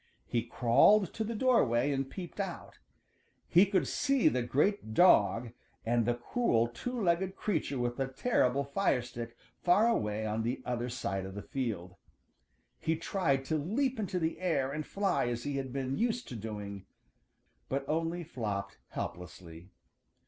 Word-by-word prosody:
He 120 - 0
crawled 125 - +4
to 220 - -2
the 225 +1 -3
doorway 145 - +3
and 135 -1 -1
peeped 180 +3 -8
out. 195 -4 -5 0.7
He 185 +4 +6
could 185 -8 +1
see 275 -3 +3
the 125 - 0
great 135 - 0
dog 115 - +5 0.3
and 115 0 +2
the 120 - +2
cruel 120 - +1
two 245 - -5
legged 190 0 +1
creature 160 -10 -1
with 120 0 -1
the 135 -1 0
terrible 135 - +1
fire 140 -3 +1
stick 120 -1 -7 0.2
far 190 +6 +4
away 110 - 0
on 110 +1 -1
the 120 +3 -2
other 120 0 -2
side 100 -6 -3
of 95 +1 -7
the 100 - -6
field. 105 -9 -4 0.8
He 160 - 0
tried 160 -5 0
to 155 +3 0
leap 240 - 0
into 200 -3 -2
the 165 -2 -1
air 160 -7 0
and 155 +1 -4
fly 195 -10 0
as 120 0 -2
he 145 -1 -2
had 135 -2 -4
been 135 0 -2
used 240 +1 0
to 125 - -6
doing, 100 -3 -6 0.8
but 135 0 -2
only 165 +2 -1
flopped 100 - -4
helplessly. 85 0 -7
135 Hz, 160 wpm, -31 LUFS, 115-185 Hz, 0.8 s, He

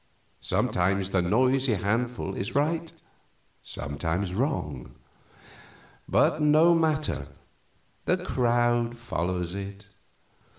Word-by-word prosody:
Sometimes 95 +2 0
the 95 - +2
noisy 125 +6 +2
handful 115 +2 -1
is 95 +4 -4
right, 160 +3 0 0.7
sometimes 80 +7 -3
wrong; 95 - -2 1.1
but 155 - +3
no 155 +3 +5
matter, 155 - 0 0.8
the - - +2
crowd 120 -1 +1
follows 90 -6 -3
it. 100 0 -7
115 Hz, 85 wpm, -27 LUFS, 90-135 Hz, 1.1 s, no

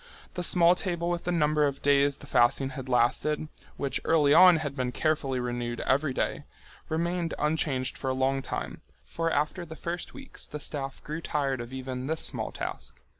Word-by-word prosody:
The 180 - -3
small 175 0 +5
table 175 -1 -2
with 175 0 -3
the 180 - 0
number 150 -3 +3
of 140 -1 -5
days 140 0 +3
the - - -13
fasting 125 +3 +3
had 130 -1 -7
lasted, 140 +5 +1 0.3
which 140 -2 -1
early 150 -3 +4
on 180 +1 +8
had 145 -3 -4
been 125 -2 -1
carefully 140 -2 0
renewed 120 -1 -3
every 140 +2 +1
day, 145 +3 -2 0.4
remained 170 +1 -1
unchanged 145 -4 0
for 135 - -2
a - - +1
long 135 +1 +1
time, - - -5 0.2
for 165 0 -2
after 150 +4 -1
the 160 -2 -9
first 170 +2 -5
weeks 270 -1 -6
the 150 - -6
staff 135 -2 -4
grew 155 +2 -5
tired 140 -5 -1
of 120 +1 -8
even 130 0 -5
this 160 +1 -1
small - - -1
task. - - -6
145 Hz, 185 wpm, -28 LUFS, 130-165 Hz, 0.4 s, on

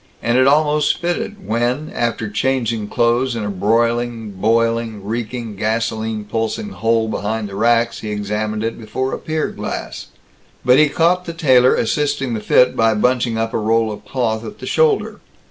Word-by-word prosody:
And 120 +1 +1
it 130 +1 +5
almost 150 +1 +3
fitted 185 +4 -3
when, 120 +7 -1
after 115 -2 -1
changing 115 -1 -1
clothes 120 +2 +1
in 115 - -3
a 105 - -2
broiling, 115 +3 0
boiling, 115 +1 0
reeking, 115 0 -4
gasoline 110 0 -2
pulsing 115 - -3
hole 115 - 0
behind 110 0 -2
the - - -10
racks, 115 +2 +2
he 110 - -6
examined 105 +1 -2
it 115 +1 -3
before 125 +4 -3
a - - -3
pier 155 0 -2
glass. - - -6 0.6
But 125 +2 +6
he 155 -1 +5
caught 180 +3 +2
the 170 - -5
tailor 130 -6 +4
assisting 140 0 0
the 110 - -2
fit 125 +4 +3
by 115 -1 +3
bunching 120 +1 +1
up 115 0 -2
a - - 0
roll 110 +1 +1
of 105 - -8
cloth 115 -4 -2
at 210 - -8
the - - -9
shoulder. 460 -4 +1
115 Hz, 170 wpm, -19 LUFS, 110-130 Hz, 0.6 s, But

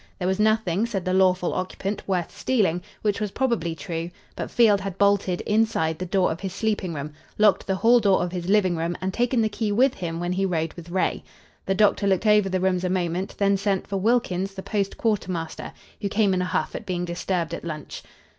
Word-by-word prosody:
There 180 - -2
was 190 +2 0
nothing, 215 -1 +2
said 195 -6 -3
the 185 - 0
lawful 185 -1 +3
occupant, 190 +2 -4
worth 180 -3 -1
stealing, 195 -9 +1 0.2
which 210 0 0
was 210 - -1
probably 235 -8 -1
true; 165 +2 -4 0.3
but - - -4
Field 210 -4 +4
had 195 -1 -5
bolted, 200 -3 +2
inside, 210 -8 +1
the 185 - -4
door 185 -1 +2
of 160 - -5
his 190 -2 -5
sleeping 200 -5 -1
room; 145 +1 -5 0.2
locked 210 -2 +3
the 190 - +1
hall 235 +5 +5
door 200 -5 +3
of 175 - -3
his 180 0 -4
living 195 -4 +3
room 165 +1 -2
and 190 0 -3
taken 240 0 +1
the - - +3
key 215 0 -2
with 250 +5 +3
him 165 -2 -4
when 175 +1 -2
he 190 +1 0
rode 165 -4 -1
with 175 -1 -11
Ray. 185 +1 0 0.4
The 195 - +1
doctor 205 0 +3
looked 190 +2 +1
over 210 -2 +4
the 185 0 0
rooms 185 -1 +1
a 180 - 0
moment; 180 0 -2
then 200 -1 +3
sent 195 -1 0
for 195 - -3
Wilkins, 195 -3 0
the 190 - -6
post 200 -2 -2
quartermaster, 185 -7 -2 0.3
who 200 - -1
came 205 -1 +2
in 180 - +1
a - - 0
huff - - -1
at - - -7
being 180 -1 -2
disturbed 175 -1 -2
at - - -5
lunch. 155 -3 -6
190 Hz, 220 wpm, -24 LUFS, 175-210 Hz, 0.4 s, hall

